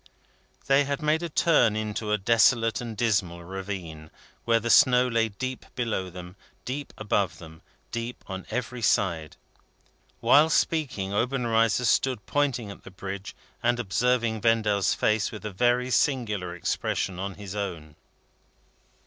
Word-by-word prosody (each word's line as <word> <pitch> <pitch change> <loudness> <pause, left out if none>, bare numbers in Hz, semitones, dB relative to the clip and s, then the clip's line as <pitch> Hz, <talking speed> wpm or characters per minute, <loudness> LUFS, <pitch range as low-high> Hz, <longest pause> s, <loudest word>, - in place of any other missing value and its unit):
They 140 +1 +4
had 140 +2 -3
made 155 +2 +2
a 170 - -3
turn 145 -9 +3
into 110 0 -3
a 105 - +3
desolate 115 +3 +3
and 115 -3 -6
dismal 95 -7 0
ravine, 90 -4 -7 0.4
where 115 -1 +3
the 120 +1 -1
snow 125 +1 +6
lay 115 -2 +1
deep 130 +5 -5
below 110 -6 -2
them, 90 +1 -10 0.3
deep 140 +3 -5
above 100 -3 0
them, 80 -1 -13 0.3
deep 115 +1 -5
on 95 -1 -7
every 125 -1 -4
side. 85 -7 +1 0.8
While 145 +7 +5
speaking, 130 -12 0
Obenreizer 115 0 +1
stood 120 -2 +1
pointing 125 -7 -1
at - - -13
the - - -10
Bridge, 95 +1 -7 0.3
and 120 0 +1
observing 115 +1 0
Vendale's 105 -3 +2
face, 110 0 +1
with 110 -1 -9
a 105 - -3
very 125 +5 +1
singular 105 -11 0
expression 90 +1 -2
on 100 0 -4
his 100 -2 -8
own. 85 -7 -5
110 Hz, 140 wpm, -26 LUFS, 95-125 Hz, 0.8 s, snow